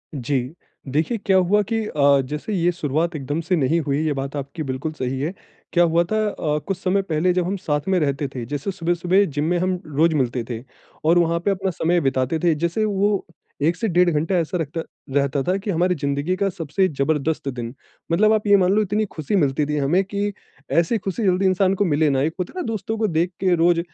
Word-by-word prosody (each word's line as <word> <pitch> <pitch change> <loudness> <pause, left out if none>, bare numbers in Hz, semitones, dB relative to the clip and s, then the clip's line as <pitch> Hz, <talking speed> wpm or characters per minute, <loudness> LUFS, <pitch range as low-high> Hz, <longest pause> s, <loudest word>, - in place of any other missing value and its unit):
जी। 135 +1 0 0.5
देखिए 160 - 0
क्या 190 -1 +4
हुआ 185 +3 +3
कि 225 -1 0
अ, 140 -6 +3
जैसे 150 +10 -4
ये 175 -2 +2
शुरुआत 165 +1 -1
एकदम 145 +2 -3
से 180 +2 0
नहीं 155 +2 +2
हुई 140 - +1
ये 150 - +1
बात 135 +1 -4
आपकी 140 +3 -5
बिल्कुल 135 +3 -3
सही 130 -2 -3
है। 160 +6 -2 0.4
क्या 175 - +5
हुआ 170 0 +3
था 215 - +2
अ, 150 -6 -1
कुछ 195 -2 -1
समय 195 +1 +1
पहले 180 -1 +1
जब 180 -1 0
हम 195 +2 -1
साथ 150 -4 -2
में 190 -2 +2
रहते 140 -1 0
थे 120 -2 -4
जैसे 145 +9 -3
सुबह-सुबह 175 +3 +1
जिम 145 -3 -2
में 175 - +2
हम 185 0 0
रोज़ 155 +2 +2
मिलते 125 -3 0
थे 115 0 -5 0.4
और 170 +2 +5
वहाँ 170 0 +2
पे 200 - +3
अपना 190 0 -1
समय 170 +1 +1
बिताते 135 +2 0
थे। 170 - +4
जैसे 170 +7 0
वो 205 -1 +1 0.4
1 165 +4 +2
से 225 +4 -2
डेढ़ 180 -1 +3
घंटा 160 +3 0
ऐसा 170 +2 -1
रखता 165 0 -3 0.3
रहता 140 0 +1
था 185 +2 +1
कि 195 +2 -6
हमारी 180 +1 +1
जिंदगी 140 +5 0
का 195 +1 0
सबसे 175 +1 0
ज़बरदस्त 150 0 -1
दिन 120 -2 -5 0.4
मतलब 215 +6 +4
आप 215 -1 0
ये 205 0 +7
मान 185 -1 +3
लो 215 - +3
इतनी 210 +2 0
खुशी 155 +5 -2
मिलती 145 -4 +2
थी 150 - 0
हमें 150 +7 +2
कि 200 +1 -2 0.4
ऐसी 170 +7 +2
खुशी 195 +3 -3
जल्दी 190 0 +2
इंसान 190 0 +3
को 205 - +1
मिले 155 -2 +2
ना, 135 -1 +1
एक 155 +3 0
होता 180 - -3
ना - - -1
दोस्तों 220 0 -3
को 220 0 +1
देख 175 0 0
के 185 -2 +3
रोज़ 170 +1 +3
170 Hz, 225 wpm, -22 LUFS, 145-190 Hz, 0.5 s, ये